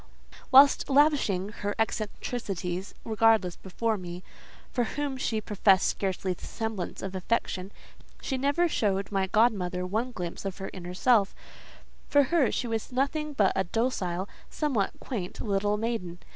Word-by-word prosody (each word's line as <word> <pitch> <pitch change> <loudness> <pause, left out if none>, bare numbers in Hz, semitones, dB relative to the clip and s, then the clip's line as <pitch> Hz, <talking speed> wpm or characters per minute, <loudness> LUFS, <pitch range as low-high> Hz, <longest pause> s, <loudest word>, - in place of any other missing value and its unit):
Whilst 275 +2 +7
lavishing 270 -10 +3
her 205 -1 -4
eccentricities 200 -4 -3
regardlessly 220 -5 +3
before 215 +3 -1
me—for 180 +7 -6
whom 285 +3 -3
she 230 -4 -1
professed 200 -2 +3
scarcely 190 -1 -1
the - - -16
semblance 220 -6 -4
of 195 -1 -4
affection—she 195 +5 -4
never 285 +6 +2
showed 200 - 0
my 195 -1 +1
godmother 190 -4 +2
one 220 +7 -1
glimpse 175 -7 -5
of 195 -2 -4
her 195 0 -6
inner 180 -1 -7
self: 215 -2 +3 0.7
for 285 0 +5
her, 295 -8 +4
she - - -1
was 225 +1 -3
nothing 290 +4 -1
but 205 -8 +3
a 190 - +2
docile, 190 -3 -1 0.2
somewhat 260 -11 0
quaint 200 -9 -5
little 205 0 0
maiden. 210 -6 -3
210 Hz, 135 wpm, -28 LUFS, 190-245 Hz, 0.7 s, Whilst